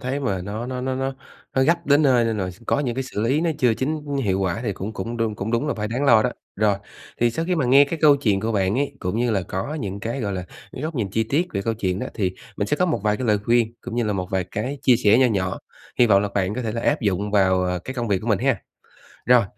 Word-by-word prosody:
thấy 135 +2 -2
mà 100 -9 -1
nó 105 +5 -5
nó 125 0 -4
nó 130 +1 -2
nó 135 +1 -2 0.4
nó 130 - +3
gấp 170 +5 +2
đến 145 +2 +5
nơi 125 -5 +4
đây 115 -1 0
nồi 95 -3 -2 0.2
có - - +2
những 125 -5 -1
cái 135 - -1
xử 125 - -5
lý 130 +7 +2
nó 170 0 +1
chưa 120 -3 +3
chính 150 +6 -2 0.2
hiệu 95 -4 0
quả 95 +2 -1
thì 110 -5 -1
cũng 100 +3 -5
cũng 115 +4 -5
đúng 115 -2 -1
cũng 105 +1 -4
đúng 120 +5 0
là 145 - 0
phải 105 -1 -3
đáng 125 +5 -1
lo 115 -6 +6
đó. 125 - +1 0.3
Rồi, 105 0 +3 0.5
thì 120 0 +4
sau 165 +8 -2
khi 180 +1 0
mà 155 -6 0
nghe 135 +3 +6
cái 160 +3 -4
câu 145 -2 +7
chuyện 105 -8 +1
của 110 +2 -1
bạn 100 +2 +1
ấy, 140 0 -1
cũng 90 +3 -2
như 120 0 +1
là 100 -4 +1
có 95 +11 -4
những 100 -9 -4
cái, 115 +6 -3
gọi 100 -4 -2
là, 90 -1 -4 0.3
cái 130 - -7
góc 160 +1 -3
nhìn 110 -8 -2
chi 110 +3 0
tiết 145 +10 +1
về 100 - -2
câu 115 +2 -1
chuyện 95 -4 -1
đó - - -3
thì 95 -3 -1 0.2
mình 100 - -1
sẽ 150 - 0
có 180 - +2
một 160 - 0
vài 105 0 +2
cái 130 - -3
lời 105 -2 +3
khuyên 115 -1 +2
cũng 120 - -7
như 120 - +1
là 105 - 0
một 90 -2 -3
vài 95 -1 0
cái 125 +10 -4
chia 125 -3 +5
sẻ 110 -1 +4
nho 130 - +5
nhỏ, 95 -5 -1 0.4
hy 120 - +6
vọng 100 -2 +5
là 105 - -1
bạn 95 0 0
có 125 - -3
thể 110 -2 -2
là 115 - -3
áp 145 +5 +1
dụng 100 -1 0
vào, 95 -2 +3
à, 90 0 -1
cái 130 - -5
công 120 -3 -2
việc 100 -2 +2
của - - -8
mình - - +3
ha. - - +2 0.7
Rồi, 125 -2 +6
115 Hz, 305 wpm, -23 LUFS, 100-130 Hz, 0.7 s, câu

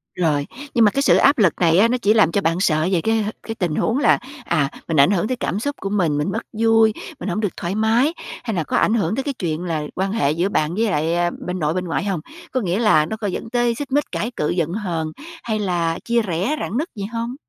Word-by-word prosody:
Rồi, 150 -5 0 0.3
nhưng 230 -2 +5
mà 205 - +4
cái 275 - 0
sự - - +5
áp 280 +1 +5
lực 190 -7 +4
này 165 -1 +4
á 225 - +6
nó 250 - +1
chỉ 210 0 +4
làm 210 -7 +4
cho 200 - +1
bạn 165 0 0
sợ 155 -3 +2
về 175 -3 +2
cái, 225 +2 +1
ờ, 215 - -2
cái 225 - -5
tình 175 -6 -1
huống 230 - +1
là, 285 - +4 0.3
à, 155 -5 +1 0.2
mình 165 - -1
ảnh 140 - +6
hưởng 195 0 +1
tới 255 0 -2
cảm 195 - -2
xúc 285 +5 -2
của 195 - -3
mình, 175 -8 +1
mình 150 +6 -1
mất 220 - -2
vui, 225 0 +4 0.3
mình 185 - -4
hông 180 - -1
được 205 -4 -2
thoải 175 +3 -3
mái, 225 +8 +2 0.3
hay 225 - -3
là 165 - 0
có - - -1
ảnh 215 - +3
hưởng 215 -1 +1
tới 270 - -2
cái 285 - -2
chuyện 165 -1 -2
là 165 -4 -2
quan 190 +1 -1
hệ 145 -10 +1
giữa 175 +5 0
bạn 155 -3 0
với 220 - +1
lại 170 +2 +1
bên 180 +1 -3
nội, 150 -1 0
bên 180 +1 -2
ngoại 170 - -1
hông? 195 -4 -1 0.3
Có 255 - 0
nghĩa 185 0 -1
là 155 -10 +4
nó 220 - -5
có 210 -1 -3
dẫn 220 +4 -4
tới 240 -1 +1
xích 280 +2 -6
mích, 290 +1 +2
cãi 230 +4 -2
cự, 150 - -1
giận 170 -2 0
hờn 170 -7 -3 0.3
hay 220 -2 -1
là 175 -4 -1
chia 235 0 +2
rẽ, 195 - -1
rạn 220 - -3
nứt 315 +6 -1
gì 200 -2 -4
hông? 235 +2 -3
195 Hz, 275 wpm, -21 LUFS, 170-225 Hz, 0.3 s, á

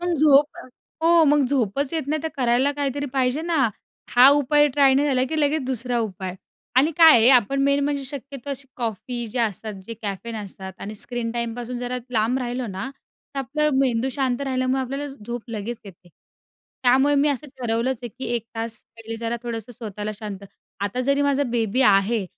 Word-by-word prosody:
पण 350 -1 0
झोप 290 0 +4
अ, - - -8 0.4
हो 335 -1 +6
मग 295 0 +4
झोपच 270 +1 0
येत 320 - 0
नाही, 310 0 -1
तर 320 - -1
करायला 255 +2 +2
काहीतरी 285 0 -2
पाहिजे 265 +3 +1
ना? 320 -8 +2 0.4
हा 250 +2 +8
उपाय 295 +1 +4
ट्राय 275 -2 +5
नाही 290 +2 +2
झाला, 255 -2 +2
की 315 -1 -1
लगेच 290 0 +1
दुसरा 250 -1 -1
उपाय 190 -4 -4 0.4
आणि 290 +5 +5
काय 320 -7 +8
आहे, 225 +3 +6
आपण 265 +2 +4
मेन 280 0 +3
म्हणजे 285 -1 -1
शक्यतो 275 0 -7
अशी 275 0 -5
कॉफी 240 +1 -4
जे 245 +3 -5
असतात 215 -1 -2
जे 230 - -6
कॅफेन 210 +3 -4
असतात 190 -2 -7
आणि 210 +2 -6
स्क्रीन 235 +2 -4
टाईमपासून 240 +1 -4
जरा 245 +1 -3
लांब 230 +3 +1
राहिलो 245 0 -3
ना, 195 +6 -5 0.4
तर - - -3
आपलं 300 +3 0
मेंदू 255 -1 +1
शांत 260 -1 -1
राहिल्यामुळे 260 0 0
आपल्याला 275 +2 -5
झोप 240 -1 -4
लगेच 225 +1 -4
येते. 180 -2 -14 0.7
त्यामुळे 265 +3 +4
मी 285 +1 +3
असं 285 +1 -2
ठरवलंच 235 +1 -1
आहे, 240 - -4
की 260 +4 -8
1 230 -1 -2
तास 225 0 -5 0.2
पहिले 225 0 -7
जरा 230 +1 -2
थोडंसं 235 0 -5
स्वतःला 215 -2 -5
शांत 200 -2 -7 0.4
आता 205 +5 -2
जरी 280 +2 +2
माझा 285 0 +2
बेबी 235 -1 0
आहे, 200 +1 +3
250 Hz, 190 wpm, -23 LUFS, 225-280 Hz, 0.7 s, हा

